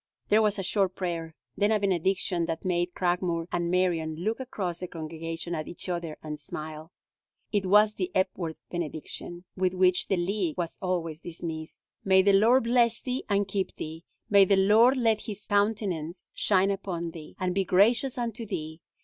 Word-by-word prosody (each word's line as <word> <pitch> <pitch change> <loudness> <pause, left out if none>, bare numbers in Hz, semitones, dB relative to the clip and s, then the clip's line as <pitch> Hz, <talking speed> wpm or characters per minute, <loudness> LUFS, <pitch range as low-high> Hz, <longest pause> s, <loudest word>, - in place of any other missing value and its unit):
There 215 +1 +5
was 210 -1 +2
a 195 - -2
short 190 0 +1
prayer, 165 -3 -4 0.2
then 205 +1 +2
a 215 - +3
benediction 185 -2 +1
that 165 +2 -4
made 175 -1 0
Cragmore 175 -2 0
and 175 -1 -1
Marion 170 -3 +1
look 215 +9 -2
across 190 -9 -4
the 180 - -5
congregation 165 +1 -5
at 155 -2 -3
each 175 - -6
other 170 -3 -3
and 150 -1 -5
smile. 155 +2 -7 0.6
It 200 -3 0
was 210 +2 +5
the 185 -3 -3
Epworth 185 -3 -1
benediction, 175 +1 -5
with 185 -1 0
which 185 0 +3
the 195 - +1
League 180 -2 -1
was 170 -2 -3
always 170 -4 -2
dismissed: 160 -2 -6 0.2
"May 190 -1 +5
the 200 0 +4
Lord 225 +6 +5
bless 235 -1 +3
thee, 255 +1 -3
and 200 -1 +2
keep 195 -1 -2
thee. 160 +2 -7 0.2
May 200 -1 +7
the 195 +1 +4
Lord 220 +7 +5
let 225 -3 +1
his 210 -2 -6
countenance 200 -5 -1
shine 195 -1 +2
upon 180 -4 -3
thee, 160 -2 -11
and 185 -1 0
be 195 +1 +1
gracious 230 - +3
unto 235 -1 -3
thee! 160 -5 -5
185 Hz, 175 wpm, -28 LUFS, 170-205 Hz, 0.6 s, May